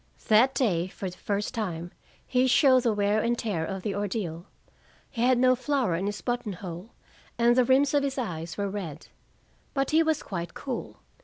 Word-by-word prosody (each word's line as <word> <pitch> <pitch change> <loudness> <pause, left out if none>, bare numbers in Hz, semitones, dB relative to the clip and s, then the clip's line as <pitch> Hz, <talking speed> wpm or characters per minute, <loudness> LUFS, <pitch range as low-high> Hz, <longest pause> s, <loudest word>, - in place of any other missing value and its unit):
That 235 +5 +5
day, 180 -9 +1
for 190 0 -6
the 180 - -14
first 205 +2 -2
time, 175 -7 -4 0.3
he 255 0 +2
showed 260 0 +5
the 235 -2 +2
wear 205 +1 +1
and 235 +1 0
tear 200 -9 -2
of 190 +2 -4
the 205 - -1
ordeal. 195 -4 -3 0.6
He 230 - -4
had 250 +1 +4
no 255 +1 +4
flower 255 - 0
in 185 +4 -1
his 205 0 -4
button 240 -4 -2
hole, 180 +2 -8 0.5
and 235 +1 +4
the 255 -1 +4
rims 270 +3 +3
of 290 - +4
his 275 -1 -2
eyes 165 -9 -4
were 200 -1 -1
red. 180 -7 -6 0.7
But 275 -1 0
he 315 +1 +5
was 320 -2 +1
quite 175 -3 -5
cool. 260 -4 -5
215 Hz, 190 wpm, -27 LUFS, 185-255 Hz, 0.7 s, That